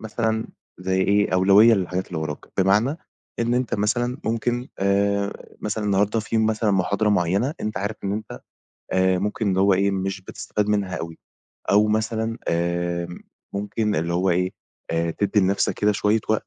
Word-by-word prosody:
مثلًا 110 0 -2 0.3
زي 95 +1 0
إيه 100 +1 +2
أولوية 100 +5 +6
للحاجات 95 -1 -2
اللي 85 - -4
وراك، 75 -2 -5
بمعنى 105 +10 +3 0.4
إن 120 +1 +1
أنت 125 -1 0
مثلًا 120 +5 0
ممكن 120 +2 -1
آآ 100 +1 0
مثلًا 105 0 -2
النهارده 105 +2 +2
في 110 +1 -1
مثلًا 110 -1 +1
محاضرة 100 +2 +1
معينة 100 - +1
أنتَ 105 0 -3
عارف 105 +2 -3
إن 100 - -1
أنت 110 +1 -5 0.5
آآ 95 0 +3
ممكن 105 +1 -1
اللي 95 - +1
هو 100 0 +5
إيه 100 +2 +2
مش 95 0 -2
بتستفاد 105 +2 -3
منها 100 -3 0
أوي 80 0 -6 0.5
أو 105 +2 +5
مثلًا 110 +1 -1
آآ 85 0 -1 0.5
ممكن 105 +1 -1
اللي 85 +2 -1
هو 90 +2 +2
إيه 90 +1 +1 0.4
آآ 85 0 0
تدّي 100 +4 +1
لنفسك 95 +1 +1
كده 105 0 +2
شوية 105 +2 +2
وقت، 110 - 0
100 Hz, 165 wpm, -23 LUFS, 95-110 Hz, 0.5 s, أولوية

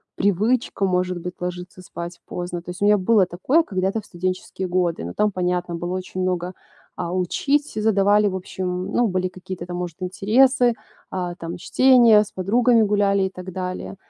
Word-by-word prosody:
привычка 205 +2 +1
может 180 -1 0
быть 180 +1 -6
ложиться 180 +1 -6
спать 170 -1 -8
поздно. 175 -1 -5
То 175 - -12
есть, 180 +2 -7
у - - +3
меня 210 0 +5
было 200 +1 +3
такое 220 - +1
когда-то 195 - -1
в - - -21
студенческие 185 +1 -4
годы, 175 - 0
но 85 - -6
там 210 0 +1
понятно 180 -1 -1
было 175 +1 -4
очень 185 0 -5
много, 180 0 -1 0.4
а, 170 - -4
учить, 280 - 0
э, - - 0
задавали 205 -1 +3
в 190 - -2
общем, 185 0 -4
ну, 240 -1 +2
были 185 -1 -1
какие-то 180 -1 -8
там 175 0 -5
может 175 -3 -5
интересы, 240 +7 +3 0.4
а, 180 -2 -3
там 170 -1 -6
чтение, 235 0 +5
с 210 - -13
подругами 230 +5 +3
гуляли 200 -2 +2
и 190 - 0
так 185 0 -9
далее. 185 +1 -5
185 Hz, 185 wpm, -22 LUFS, 180-210 Hz, 0.4 s, меня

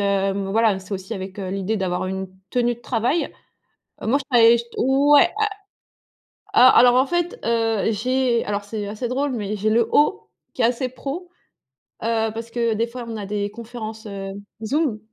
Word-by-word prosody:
m 195 0 0
voilà, 220 -2 +3
c'est 190 +2 -10
aussi 190 +3 -6
avec, 195 0 -6
heu, 190 -2 -4
l'idée 195 +3 -1
d'avoir 185 -2 -1
une 190 0 -4 0.2
tenue 240 -1 +1
de 235 - -21
travail. 245 +8 0 0.7
Moi 245 +6 +2
je 275 - -8
travaillais 235 -1 +6
ch 235 - -4
ouais 280 +3 +5
a 430 - +3 1.1
a 255 +1 +7
alors 245 0 +6
en 260 +2 +4
fait, 350 - -1
heu, 225 -2 +1
j'ai 250 +2 +1
alors 205 0 -2
c'est 205 -1 -5
assez 215 +4 -4
drôle 275 +4 -1
mais, 210 -4 -3
j'ai 210 +2 -1
le 230 +1 +3
haut, 300 +7 +2 0.3
qui 255 - -1
est - - +4
assez 250 +2 +1
pro, 280 +8 -6 0.8
heu, 225 -1 0
parce 230 +1 -6
que 235 -1 0
des 225 +2 0
fois, 240 0 -7
on 230 - -5
a 210 -2 -5
des 205 0 -2
conférences, 220 0 -8
heu, 195 -1 -6 0.3
Zoom, 275 -3 0
230 Hz, 185 wpm, -22 LUFS, 205-250 Hz, 1.1 s, a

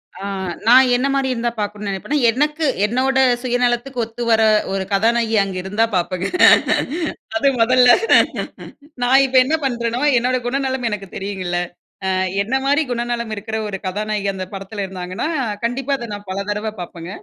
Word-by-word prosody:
ஆ. 185 - -11 0.5
நான் 255 +3 +7
என்ன 255 +3 +1
மாரி 270 -1 0
இருந்தா 240 0 -2
பாக்கணும்னு 210 0 -4
நெனைப்பன்னா? 195 +10 -2
எனக்கு, 300 +6 0 0.2
என்னோட 255 +4 0 0.3
சுயநலத்துக்கு 245 +1 0
ஒத்துவர்ற 225 -1 +1 0.3
ஒரு 195 - -1
கதாநாயகி 225 +2 +2
அங்க 195 -1 -5
இருந்தா 205 +4 +1
பாப்பங்க. 185 +1 -1 1.1
அது 280 - +1
முதல்ல. 250 +1 +5 1.1
நான் 265 +2 +5
இப்ப 260 0 +1
என்ன 305 +5 +1
பண்றனோ 235 -2 -2 0.2
என்னோட 250 +2 +1
குணநலம் 260 -1 -1
எனக்கு 205 -2 -5
தெரியுங்கள்ல. 190 -3 -3 0.5
அ - - 0 0.3
என்னை 230 +7 0
மாரி 285 +3 +2
குணநலம் 235 -1 -3
இருக்குற 220 +1 -4
ஒரு 200 -2 -4
கதாநாயகி 210 +1 -2
அந்த 190 -1 -5
படத்துல 195 +1 -5
இருந்தாங்கன்னா, 185 +6 -5 0.4
கண்டிப்பா 250 +4 -2
அத 235 -2 -7
நான் 205 -1 -9
பல 190 +1 -3
தடவ 210 +1 -2
பாப்பங்க. 170 -1 -8
230 Hz, 145 wpm, -19 LUFS, 200-250 Hz, 1.1 s, நான்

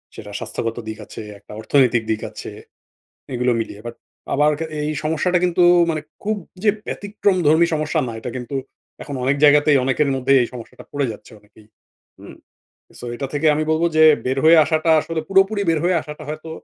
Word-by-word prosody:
সেটা - - -10
স্বাস্থ্যগত 115 0 -4
দিক 110 - -5
আছে, - - -9 0.2
একটা - - -17
অর্থনৈতিক 120 0 +2
দিক 110 - -2
আছে, - - -9 0.8
এগুলো 125 0 +1
মিলিয়ে। 105 -2 -6
বাট 120 - -6 0.4
আবার 150 +2 +3
এ - - -2 0.2
এই 155 - -1
সমস্যাটা 160 +4 +1
কিন্তু 180 0 +2 0.3
মানে 155 -1 -2 0.2
খুব 215 +1 -1 0.3
যে 215 - +2 0.2
ব্যতিক্রম 205 -1 -1
ধর্মী 160 +3 +5
সমস্যা 150 0 -1
না। 115 - -5
এটা 125 - -5
কিন্তু 130 +2 -5 0.5
এখন 145 - -7
অনেক 135 +2 +2
জায়গাতেই 145 0 +5
অনেকের 135 +3 +1
মধ্যে 130 +1 +1
এই 120 - -2
সমস্যাটা 120 -3 -11
পড়ে 140 -2 -1
যাচ্ছে 110 - -14
অনেকেই, 105 +1 -22 0.5
হুম? - - -12 0.6
সো - - -8
এটা 135 +3 -4
থেকে 145 +2 +1
আমি 155 - 0
বলব 160 +1 +1
যে 160 - +7 0.2
বের 130 +1 -1
হয়ে 165 +1 +7
আসাটা 160 +1 +1
আসলে 165 +1 -4
পুরোপুরি 195 +2 +3
বের 165 -2 +2
হয়ে 180 +1 +2
আসাটা 150 +1 -9
হয়তো 155 +1 -7
150 Hz, 185 wpm, -20 LUFS, 125-165 Hz, 0.8 s, যে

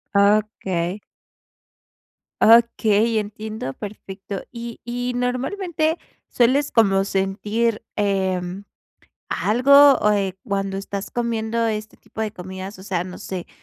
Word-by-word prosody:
Okey. 200 -3 +1 1.4
Okey, 225 -1 +4
entiendo 215 -8 -5
perfecto. 195 0 -7
Y 235 -1 -8
y, 245 +1 -2
¿normalmente 310 +7 -1 0.3
sueles 265 +4 +2
como 195 -4 +4
sentir, 210 +4 -1
em, 190 -2 -1 0.6
algo, 280 +5 +6
o, 210 - +2
eh, 195 -2 -1
cuando 195 -2 -2
estás 195 0 -5
comiendo 230 -1 -1
este 215 -1 -4
tipo 220 - -8
de 215 -1 -2
comidas? 190 +1 -8
O - - -11
sea, 185 -4 -1
no 180 0 -9
sé. 185 -2 -6
210 Hz, 110 wpm, -22 LUFS, 195-235 Hz, 1.4 s, algo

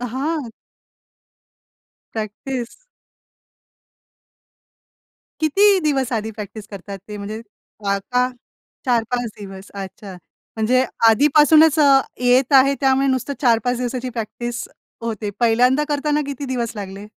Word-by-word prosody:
हां. 265 +3 -3 1.6
प्रॅक्टिस. 235 +3 -5 2.6
किती 390 +6 +4
दिवस 270 -5 0
आधी 220 -1 -2
प्रॅक्टिस 210 0 -8
करतात 200 0 -8
ते. 210 - -6
म्हणजे 205 +2 -6 0.5
वा 200 0 +1
का 250 +5 0 0.6
4-5 245 0 0
दिवस. 195 -1 -10
अच्छा, 195 0 -8 0.4
म्हणजे 245 +4 +2 0.3
आधीपासूनच 300 +5 +5
अ, 275 -2 +6 0.2
येत 250 +2 +3
आहे. 275 +1 +6
त्यामुळे 270 0 +2
नुसतं 265 +1 -1
4-5 245 -1 +2
दिवसाची 250 +1 -3
प्रॅक्टिस 240 +1 -5 0.3
होते. 220 -3 -3
पहिल्यांदा 250 +4 +3
करताना 295 +1 0
किती 280 0 -5
दिवस 240 -3 -3
लागले? 200 0 -7
245 Hz, 105 wpm, -20 LUFS, 215-275 Hz, 2.6 s, अ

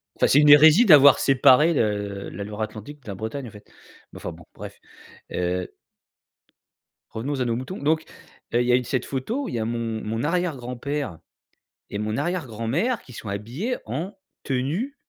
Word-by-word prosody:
enfin - - +2
c'est 145 - +5
une 150 - +5
hérésie 155 +9 +8
d'avoir 145 - +8
séparé 135 +4 +5
le 100 -5 -2
la 100 - -6
Loire-Atlantique 110 +7 -7
de - - -20
la 100 - -5
Bretagne 115 +6 -5
en - - -11
fait, 105 - -15 0.5
mais - - -10
enfin - - -6
bon - - -14
bref, - - -10 0.5
heu 90 0 -2 1.4
revenons 135 +5 -4
à 125 - 0
nos 115 - 0
moutons, 130 +10 -6
donc 155 +2 0 0.5
heu, 120 - +3
il 120 - -1
y - - +3
a - - +6
eu 125 - +1
cette 125 +1 -2
photo, 225 - -3
il - - -6
y 115 - -2
a 110 - -1
mon 115 -1 -3
mon 115 +4 -3
arrière 175 0 0
grand 125 0 -7
père 140 - -4 0.7
et 100 - -4
mon 110 +1 -2
arrière 170 +2 -2
grand 115 -1 -6
mère 220 - 0
qui 125 - -15
sont 110 - -8
habillés 120 - -3
en 160 - -5 0.3
tenue 150 - -2
130 Hz, 195 wpm, -24 LUFS, 110-150 Hz, 1.4 s, hérésie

